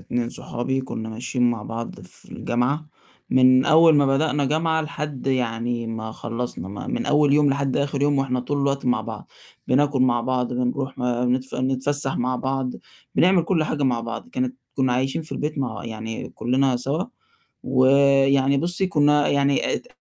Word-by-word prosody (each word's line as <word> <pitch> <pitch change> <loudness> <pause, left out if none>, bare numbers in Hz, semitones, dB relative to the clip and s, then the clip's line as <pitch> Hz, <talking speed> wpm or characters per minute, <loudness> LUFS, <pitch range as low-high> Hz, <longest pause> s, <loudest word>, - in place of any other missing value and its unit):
2 120 -1 -2
صُحابي 125 +2 -3
كُنّا 110 -4 -6
ماشيين 120 +2 0
مع 115 -3 -4
بعض 115 +2 -6
في - - -11
الجامعة، 125 +6 -1 0.4
من 130 0 +5
أول 160 0 +6
ما 145 - +4
بدأنا 145 +1 +1
جامعة 160 +3 +1
لحد 150 -4 -6
يعني 120 -2 -1
ما 110 -1 -5
خلّصنا 115 -6 -5
م 100 +1 -6
من - - -2
أول 145 -1 +4
يوم 145 -1 +4
لحد 140 -1 0
آخر 140 -1 -1
يوم 145 -1 +2
وإحنا 130 -2 0
طول 145 +4 -2
الوقت 140 0 0
مع 120 -3 +2
بعض، - - -8 0.4
بناكل 140 +1 +2
مع 120 -2 +2
بعض، 125 0 -1
بنروح 125 +2 -2
نتف 125 +1 -1
نتفسح 135 +2 -1
مع 125 +1 -1
بعض، 130 0 -2 0.4
بنعمل 180 0 +4
كل 165 -2 +1
حاجة 150 -1 -2
مع 125 -3 +1
بعض 115 - -6
كانت 255 0 -3 0.2
كُنّا 130 -3 +1
عايشين 130 +5 -1
في 155 - -8
البيت 150 0 -3
مع 120 -7 -3
يعني 110 0 -6
كُلّنا 130 +1 +1
سوا 140 +8 -2 0.6
ويعني 135 +1 +4
بُصّي، 175 +5 0
كُنّا 150 -4 +3
يعني 140 0 +1
ات - - -5
135 Hz, 170 wpm, -23 LUFS, 125-145 Hz, 0.6 s, أول